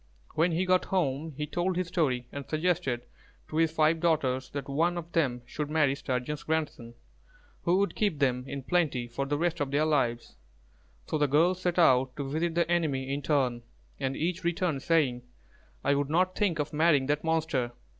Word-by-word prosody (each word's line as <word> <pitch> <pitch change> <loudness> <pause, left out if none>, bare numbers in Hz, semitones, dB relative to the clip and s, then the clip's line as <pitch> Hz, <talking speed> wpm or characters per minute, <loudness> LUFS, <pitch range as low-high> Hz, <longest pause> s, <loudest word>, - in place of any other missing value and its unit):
When 170 +2 +2
he 180 +3 +1
got 185 0 +3
home, 155 -4 -1
he 150 - -2
told 175 +4 -1
his 180 -1 -1
story, 140 -9 0
and 140 -1 -7
suggested 155 -7 0 0.4
to 155 - -5
his 165 -1 +3
five 160 0 +2
daughters 130 -6 +1
that 140 -2 -5
one 165 +5 +1
of 170 0 -6
them 125 -7 0
should 150 +4 -4
marry 150 -3 +3
Sturgeon's 135 +1 -3
grandson, 150 -7 -3 0.7
who 175 +1 +3
would 200 +1 +1
keep 205 -8 0
them 125 -3 +1
in 140 -1 -5
plenty 145 -7 0
for 130 +4 -3
the 145 +1 0
rest 170 +1 0
of 145 -2 -1
their 145 +3 +2
lives. 125 -6 0 0.7
So 155 - -2
the 145 - +3
girls 170 +6 +3
set 180 -1 -1
out 130 -6 +4
to 140 -2 -4
visit 160 +4 -1
the 170 -2 +2
enemy 140 -6 0
in 140 - -2
turn, 130 -6 +1 0.4
and 135 0 -2
each 180 +3 -2
returned 170 -4 0
saying, 140 -7 +2 0.6
"I - - +3
would 140 0 0
not 180 +4 +2
think 195 -6 +1
of 150 +1 -3
marrying 150 -3 +3
that 150 +2 0
monster. 160 -7 0
150 Hz, 190 wpm, -29 LUFS, 135-170 Hz, 0.7 s, out